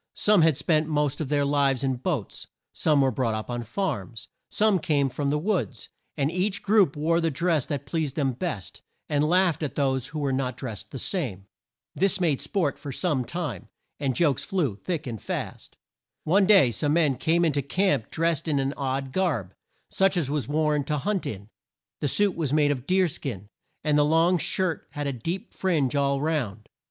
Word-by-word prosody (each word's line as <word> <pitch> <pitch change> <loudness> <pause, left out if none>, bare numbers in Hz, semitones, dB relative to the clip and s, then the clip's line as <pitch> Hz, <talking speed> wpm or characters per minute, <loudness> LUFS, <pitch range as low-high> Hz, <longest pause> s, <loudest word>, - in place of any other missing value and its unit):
Some 210 -3 +4
had 160 -4 +4
spent 155 +1 +1
the 160 - -4
most 150 0 0
of 145 - -3
their 145 -1 +2
lives 140 -2 +2
in 130 -2 0
boats, 135 - -3 0.3
some 150 -3 +2
were 135 -1 +3
brought 115 -5 -1
up 110 +3 -5
on 120 0 -2
farms, 120 - -4 0.2
some 210 -3 +2
came 145 -4 +1
from 140 +3 -2
the 150 - +1
woods, 165 - -2 0.3
and 140 +2 +1
each 190 +3 -1
group 205 -7 +4
wore 165 +3 +1
the 165 - +1
dress 160 -1 0
that 140 -1 -3
pleased 155 -2 -2
them 140 -4 +1
best, 125 - -5 0.3
and 145 -1 +1
laughed 170 0 +3
at 150 - -3
those 130 -3 0
who 155 - -7
were 140 -3 0
not 130 -2 -2
drest 115 -7 -6
the 135 - -7
same. 125 - -3 0.5
This 195 0 +1
made 155 -7 +1
sport 145 0 -1
for 145 -2 -6
some 145 -2 0
time 170 +5 -5 0.3
and 135 -3 -1
jokes 150 -7 +2
flew 155 - -1
thick 165 - -4
and 115 -5 -6
fast. - - -6 0.5
One 190 +4 +3
day 195 - +6
some 145 +5 0
men 155 -5 +3
came 170 +5 +2
in 160 - +3
to 145 0 0
camp 185 - 0
drest 165 0 0
in 150 -3 +1
an 135 0 0
odd 135 -1 -2
garb, 130 - -1 0.4
such 195 -1 +2
as 145 -5 0
was 145 -6 -1
worn 150 -1 +1
to 150 +1 -1
hunt 195 +5 -1
in. 100 -1 -6 0.5
The 145 - 0
suit 205 +6 +2
was 155 -5 -1
made 150 -1 +3
of 130 -2 -4
deer 185 0 +3
skin, 110 - -5 0.3
and 150 -1 +3
the - - +5
long 165 +4 +3
shirt 180 0 0
had 145 0 -3
a 140 - -1
deep 165 - -5
fringe 150 -9 0
all 140 -1 +1
round. 130 -9 -2
150 Hz, 200 wpm, -26 LUFS, 135-170 Hz, 0.5 s, day